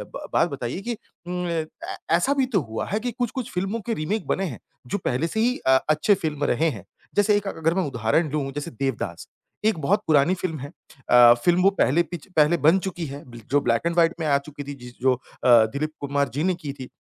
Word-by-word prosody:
ब - - -6
बात - - +3
बताइए 120 +8 -4
कि 235 +2 -4 0.3
उम 180 0 -3
अ, - - -3
ऐ 160 -2 -4 0.2
ऐसा 175 +11 +2
भी 275 -2 +2
तो 225 -8 0
हुआ 110 - -2
है 210 - -1
कि 245 +2 -3
कुछ-कुछ 245 +1 -3
फिल्मों 195 +5 -2
के 235 - -1
रीमीक 205 +5 -2
बने 195 - 0
हैं, 135 - -6 0.3
जो 160 - -1
पहले 130 +7 0
से 220 - -3
ही 245 +3 +2
अ, 130 0 +7
अच्छे 155 +7 +4
फिल्म 150 -2 -2
रहे 160 +6 +2
हैं। 115 -9 -7 0.3
जैसे 205 0 +4
एक 205 -1 -4
अ, - - -1
अगर 160 +1 +1
मैं 190 +1 +1
उदाहरण 125 +5 +1
दूँ 140 -2 -2
जैसे 145 +1 -5
देवदास 135 0 -3 0.4
एक 220 -4 +3
बहुत 200 +9 +2
पुरानी 155 +3 +4
फिल्म 175 -4 -4
है। 140 - -6 0.4
अ, 120 -1 +8
फिल्म 175 +1 +4
वो 195 - +6
पहले 150 +7 +4
पिच 170 -1 -9
पहले 155 +2 +4
बन 165 +5 +7
चुकी 180 -3 -4
है 140 0 -8
बिल 120 -1 -11
जो 145 - +5
ब्लैक 115 -2 +1
एंड 170 0 0
व्हाइट 170 0 +4
में 160 - -2
आ 140 -1 +4
चुकी 145 +1 -8
थी, 145 +1 -6
जिस 125 -3 -11
जो 130 0 +4
अ, 125 - -6 0.3
दिलीप 125 +5 +4
कुमार 140 -1 0
जी 145 +4 -1
ने 185 +1 +2
की 150 -5 -6
थी। 130 -2 -9
155 Hz, 245 wpm, -24 LUFS, 140-185 Hz, 0.4 s, अ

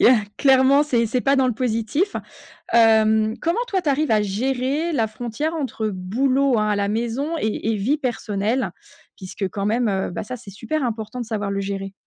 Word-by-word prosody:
il - - +6
y - - +9
a 255 - +7 0.2
clairement 270 +1 +5
c'est 240 -6 +1
c'est 245 +3 0
pas 275 +2 +2
dans 265 -1 +3
le - - +1
positif. 235 - -1 0.6
Hem, 220 -1 +4
comment 335 +6 0
toi 390 -6 0
tu 310 - -1
arrives 285 0 +1
à 215 -1 +4
gérer 260 - -1
la 230 -8 +1
frontière 240 +8 -4
entre 260 -7 -2
boulot, 255 +8 +1
hein, 210 0 +1
à 210 - +2
la 200 0 0
maison 235 +8 -2
et 220 0 -1
et - - 0
vie 245 +10 +1
personnelle? 225 - -1 0.4
Puisque 190 +1 -5
quand 200 +2 -3
même, 230 +3 +1
heu 190 -2 -1
bah - - -4
ça, 250 +5 -6
c'est 215 -4 -11
super 310 +9 -3
important 225 0 -4
de - - -4
savoir 210 -3 -3
le 200 - -1
gérer. 195 0 -4
230 Hz, 210 wpm, -22 LUFS, 210-270 Hz, 0.6 s, y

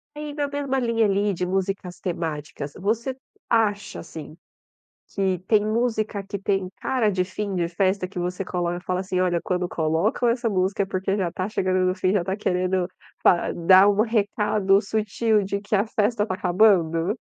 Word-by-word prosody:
É 300 - -7
e 295 -1 -5
na 290 -1 -1
mesma 280 -2 -2
linha 230 -2 +2
ali 200 0 +1
de 180 +1 -2
músicas 190 -1 -2
temáticas, 155 -5 -4
você 230 +6 -1 0.3
acha 205 -3 +1
assim, 160 -2 -9 0.7
que 190 -2 -1
tem 210 -2 +3
música 215 -2 0
que 200 +1 -5
tem 195 -1 -1
cara 235 -6 +1
de 185 -1 +1
fim 200 +1 -4
de 170 -1 0
festa? 185 +1 0
Que 185 -1 -7
você 180 +2 -3
coloca 175 -1 -2
e 180 - -10
fala 185 0 -1
assim: 185 -1 -2
"Olha 180 -2 +2
quando 180 -1 -1
colocam 165 +10 +1
essa 235 0 0
música 195 +1 +1
é - - -4
porque 190 0 -1
já 180 -3 0
está 185 +3 -4
chegando 185 -3 0
no 185 0 +1
fim. 185 -2 +1
Já 195 -4 +2
tá 190 +2 -2
querendo 185 -1 0 0.4
pa 175 - +4
dar 185 +3 +6
um 205 +1 +3
recado 210 -3 +2
sutil 215 +1 +1
de 200 +1 -2
que 205 +1 -1
a 200 +2 +2
festa 215 0 0
está 185 -3 -2
acabando?" 180 -1 +3
195 Hz, 185 wpm, -24 LUFS, 180-215 Hz, 0.7 s, dar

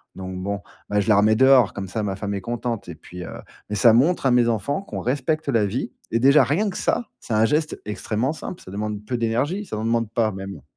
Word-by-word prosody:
donc 95 -1 -6
bon, 100 +2 -3 0.3
bah, 105 0 +2
je 100 - -1
la 105 - +6
remets 110 +2 +4
dehors, 130 -3 +5
comme 100 -1 -5
ça, 110 +4 -3
ma 100 -2 -2
femme 100 +1 -4
est 100 - -3
contente 115 -1 -3
et 85 - -7
puis, 90 +3 -10
heu - - -8 0.3
mais, 105 - -2
ça 115 +3 +6
montre 145 +7 +3
à 130 - +4
mes 120 -1 +4
enfants 120 - -1
qu'on - - -6
respecte 145 +4 -1
la 115 -5 +3
vie 115 +7 -3 0.2
et 115 - +2
déjà, 140 +3 +6
rien 175 - +1
que 185 - -6
ça, 240 - -1
c'est 115 - -5
un 110 +1 +4
geste 150 +5 0
extrêmement 110 +6 -2
simple, 175 - -8
ça 95 - -11
demande 105 0 -4
peu 125 - -2
d'énergie, 130 - -1
ça - - -6
n'en 110 - -3
demande 115 -1 +1
pas, 110 -1 +1
même. 95 -6 -8
115 Hz, 250 wpm, -23 LUFS, 100-130 Hz, 0.3 s, la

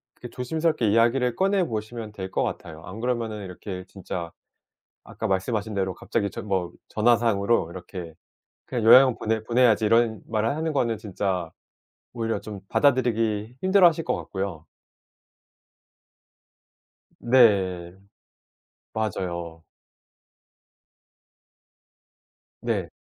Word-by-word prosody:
그 - - -10
조심스럽게 155 -2 0
이야기를 120 +3 +3
꺼내 195 0 +2
보시면 110 -1 -5
될 95 -2 -7
것 - - 0
같아요. 80 -2 -5
안 95 +5 -8
그러면 120 -2 -1
이렇게 95 0 -7
진짜 90 -3 -6 0.7
아까 - - -4
말씀하신 105 +3 -1
대로 95 -2 -1
갑자기 100 +3 -2
전 - - -7
뭐 95 -3 -1 0.2
전화상으로 115 -4 +2
이렇게 90 -2 -8 0.5
"그냥 120 -4 -3
요양원 125 +2 +8
보내 110 0 -1
보내야지." 115 -2 +3
이런 115 0 +3
말을 110 0 0
하는 160 0 -2
거는 115 -5 +1
진짜 95 -5 -3 0.6
오히려 115 -2 -2
좀 105 -2 -8
받아들이기 115 -5 +1
힘들어하실 180 -4 +5
것 - - 0
같고요. 95 -5 -5 2.6
네. 95 -8 +3 1.0
맞아요. 85 -6 -3 3.0
네. - - -1
110 Hz, 245 characters per minute, -25 LUFS, 95-120 Hz, 3.0 s, 요양원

